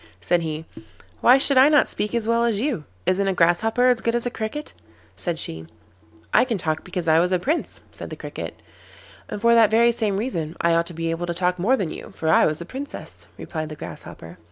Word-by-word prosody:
said 175 -1 +1
he. 160 -1 -4 0.5
'Why 250 +2 +6
should 275 -1 +3
I 270 +3 +7
not 295 -2 +4
speak 210 +3 -3
as 225 -2 -1
well 230 0 +2
as 230 -4 +1
you? 235 - -2 0.2
Isn't 195 +1 +1
a 190 - 0
Grasshopper 210 +9 +3
as 250 -3 +3
good 230 0 0
as 240 - -1
a 245 - -1
Cricket?' 225 +8 -5 0.4
said 170 -2 -3
she. 80 - -4 0.7
'I - - +5
can 235 -4 -1
talk 155 -3 -2
because 180 -2 -4
I 160 0 +5
was 180 +2 +2
a 185 - +3
Prince,' 295 - -2
said - - -7
the - - -6
Cricket. - - -8 0.7
'And - - -4
for 235 +2 +4
that 225 -2 +6
very 235 +2 +4
same 215 -4 -1
reason 170 -9 -3
I 170 0 +2
ought 170 0 +2
to 175 - -5
be 165 0 -2
able 170 +1 -3
to 170 - -2
talk 180 0 0
more 240 +9 +3
than 185 -8 -2
you, - - -9
for 160 - -2
I - - +5
was 155 0 -1
a 170 - -6
Princess,' 270 +9 -8
replied 155 -2 -5
the 155 - -7
Grasshopper. 85 - -10
195 Hz, 230 wpm, -23 LUFS, 165-235 Hz, 0.7 s, I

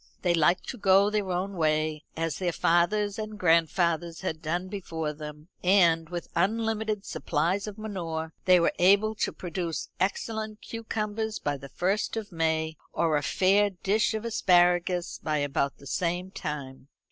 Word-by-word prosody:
They 175 -2 +3
liked 170 +2 +2
to 250 - -6
go 195 +1 +5
their 210 -3 -1
own 185 +3 -2
way, 155 -1 0
as 165 -1 -2
their 180 -2 0
fathers 200 +6 +2
and 215 0 -5
grandfathers 170 -1 +2
had 160 -4 -3
done 175 +3 -2
before 165 -6 -4
them; 150 +1 -9
and, 170 -4 +4
with 175 -1 -5
unlimited 220 +2 0
supplies 175 +7 -1
of 210 0 -7
manure, 165 -7 -4
they 185 -1 +6
were 170 - +2
able 200 +4 +5
to 215 - -1
produce 170 -2 -4
excellent 215 +3 -2
cucumbers 220 -1 -3
by 145 -1 -2
the 140 0 -11
first 195 +8 -1
of 220 -2 -5
May, 160 -1 0
or 165 -2 +1
a 145 - +2
fair 195 +7 +3
dish 210 +4 0
of 220 +1 -4
asparagus 180 -4 +2
by 155 -1 0
about 140 -1 -1
the 140 - -15
same 175 +5 -2
time. 140 -6 -6
180 Hz, 160 wpm, -28 LUFS, 160-205 Hz, -, they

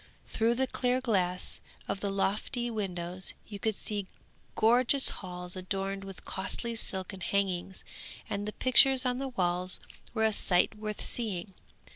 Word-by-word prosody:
Through 230 +1 +2
the 265 +2 +2
clear 250 -1 0
glass 185 -8 0 0.3
of - - -2
the 200 - -1
lofty 210 +5 -1
windows 185 -4 -1
you 205 -2 -8
could 220 +1 0
see 205 -2 -3 0.5
gorgeous 245 +4 +5
halls 180 -1 -2
adorned 195 +1 -3
with 195 -1 -10
costly 235 +4 -2
silken 190 -3 -3
hangings, 190 -1 -1 0.4
and 205 +1 -3
the 210 - -4
pictures 260 +1 +5
on 250 0 0
the 270 - -2
walls 180 -6 0 0.4
were 220 -1 +3
a 220 - +3
sight 180 -1 +3
worth 215 0 -5
seeing. 195 -5 -2
200 Hz, 145 wpm, -30 LUFS, 185-235 Hz, 0.5 s, gorgeous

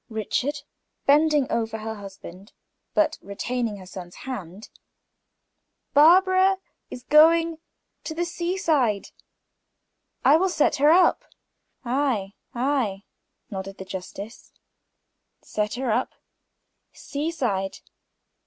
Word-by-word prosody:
Richard" 255 +6 -2 0.4
bending 300 0 +4
over 225 -1 -1
to 215 - -10
her 220 0 -3
husband, 195 -1 -11 0.4
but 315 0 +3
still - - -13
retaining 230 +1 -2
her 190 - -11
son's 180 -1 -10
hand 205 -6 -7 1.2
"Barbara 375 +5 +5 0.3
has 245 - -9
agreed 320 +4 +6
to - - -3
go - - -28 0.5
to 315 - -5
the 345 +1 -1
seaside, 330 - 0 1.2
I 285 +4 +7
will 380 +3 +1
set 320 -4 +2
her 290 +2 +5
up." 350 +2 +4 0.6
"Ay, 240 -6 0 0.2
ay," 240 -6 0 0.5
nodded 195 0 -6
the 190 - -8
justice, 195 +4 -8 0.9
"set 210 -1 -2
her 250 -2 -1
up. 245 +4 -1 0.8
Seaside? 255 -11 -3
250 Hz, 110 wpm, -24 LUFS, 200-310 Hz, 1.2 s, I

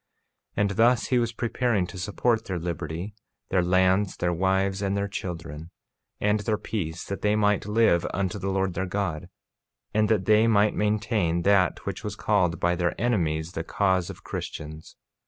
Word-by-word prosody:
48:10 - - +2
And 100 - +1
thus 115 +4 +3
he 125 - +3
was 115 -1 0
preparing 115 -3 0
to 95 +1 -9
support 110 +4 0
their 95 - -3
liberty, 85 +3 -4 0.4
their 95 - +2
lands, 95 +2 +2
their 90 0 0
wives, 95 +2 +1
and 100 0 0
their 100 0 -1
children, 85 -5 -6 0.5
and 105 +1 +2
their 105 0 -1
peace, 90 -7 -4
and 100 - -2
that - - -15
they 105 0 +2
might 105 -1 +1
live 105 -5 +3
unto 95 +1 -2
the 95 +1 -2
Lord 95 -1 0
their 95 +2 -2
God, 90 -5 -3 0.6
and 105 0 +2
that 105 -4 +2
they 110 +2 +5
might 105 -1 +4
maintain 105 -5 0
that 95 -2 +2
which - - -4
was 105 -2 -4
called 95 -6 +1
by 90 - +2
their 85 -1 -1
enemies 85 -9 0
the 80 - -4
cause 95 0 +1
of - - -10
Christians. 75 +1 -7
95 Hz, 180 wpm, -26 LUFS, 90-105 Hz, 0.6 s, they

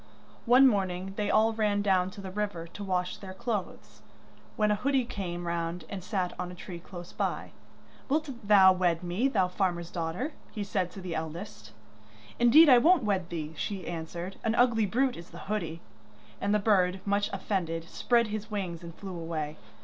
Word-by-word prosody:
One 255 +3 +8
morning 190 -4 0
they 205 0 -1
all 220 +1 +4
ran 210 -2 +1
down 185 -2 +2
to 200 - -10
the 190 -1 -7
river 200 -4 -3
to 190 +4 -9
wash 180 -2 -1
their 190 -2 -9
clothes, 215 -2 -4 0.5
when 210 -1 +2
a - - +3
hoodie 265 +3 +1
came 180 -7 -5
round 170 0 -3
and 195 -3 -6
sat 185 -2 -2
on 180 0 -3
a - - -9
tree 175 -1 -8
close 175 0 -10
by. - - -2 0.6
'Wilt 305 +2 +1 0.2
thou 190 -2 +8
wed 180 -2 +1
me, 180 +9 +1
thou 195 -9 +2
farmer's 180 -2 -1
daughter?' 175 - -3 0.2
he 210 - -4
said 190 -3 -1
to 195 - -10
the 180 -2 -5
eldest. 160 - -6 0.7
'Indeed 270 +8 +8
I 255 -4 +8
won't 335 +1 +5
wed 190 -4 0
thee,' 160 -2 -4
she 195 -2 -4
answered, 170 +2 -5
'an 225 0 +1
ugly 230 -4 +3
brute 255 +5 +1
is 170 +1 -10
the - - -11
hoodie.' 170 -6 -3 0.6
And 200 - 0
the 210 - +4
bird, 190 -3 +2
much 205 0 +1
offended, 170 -4 -2
spread 235 +3 +2
his 215 0 -4
wings 185 -6 -3
and 170 -1 -9
flew 195 -2 -7
away. 160 -3 -4
190 Hz, 185 wpm, -29 LUFS, 175-215 Hz, 0.7 s, One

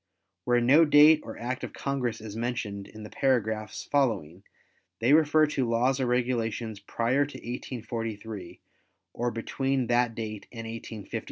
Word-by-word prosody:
Where 120 0 +3
no 140 +7 +6
date 150 0 +7
or 110 - -8
Act 125 +2 -4
of - - -5
Congress 130 -5 -2
is 110 -1 -8
mentioned 110 -4 -3
in 110 0 -11
the 105 - -9
paragraphs 110 -5 0
following, 100 - 0 0.6
they 120 +5 +3
refer 155 0 +5
to 135 -5 -1
laws 125 +4 +2
or 130 - 0
regulations 120 -3 -1
prior 120 +7 +1
to 145 - -7
1843 115 -5 -6 0.5
or 120 +1 -1
between 135 +3 -1
that 120 -1 +2
date 110 -2 -6
and 115 -2 -7
1857. 115 -2 -6
120 Hz, 150 wpm, -28 LUFS, 110-130 Hz, 0.6 s, date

